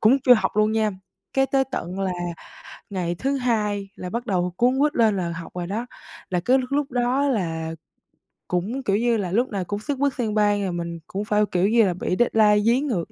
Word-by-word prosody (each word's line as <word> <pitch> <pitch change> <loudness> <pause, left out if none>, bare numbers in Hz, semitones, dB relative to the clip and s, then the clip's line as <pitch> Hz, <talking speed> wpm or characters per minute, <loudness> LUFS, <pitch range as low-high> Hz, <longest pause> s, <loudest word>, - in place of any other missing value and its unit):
cũng 225 +5 +5
chưa 250 - +8
học 215 -2 -1
luôn 215 0 +3
nha. 220 -1 +1 0.4
Cái 270 0 +3
tới 270 0 +2
tận 180 +3 -4
là 190 -1 0 0.8
ngày 175 -3 -2
thứ 275 +9 -1
Hai 210 -5 -1
là 180 - -6
bắt 235 +5 -4
đầu 180 -3 0
cuống 250 +4 +2
quýt 295 +1 +2
lên 220 -4 +3
là 170 -2 -2
học 165 0 -7
rồi 175 -1 -3
đó. 225 +5 -3 0.4
Là 180 - 0
cứ 250 +9 +3
lúc 260 0 -4
lúc 285 -1 0
đó 250 +3 +1
là 165 -9 -1 0.8
cũng, 205 +10 -2
kiểu 200 -4 +1
như 235 0 +2
là, 185 -4 -3
lúc 240 +6 +1
nào 195 -3 -2
cũng 205 - -3
xất 275 +6 -3
bất 280 -1 +2
xang 225 -4 -2
bang, 205 -1 +2
rồi 190 - -1
mình 170 -1 -4
cũng 200 +2 -4
phải, 210 0 +2
kiểu 185 +2 +2
như 230 +1 +5
là, 185 - +1
bị 180 +1 -2
deadline 215 -3 +4
dí 235 +3 +4
ngược 225 - -2
210 Hz, 230 wpm, -23 LUFS, 185-245 Hz, 0.8 s, chưa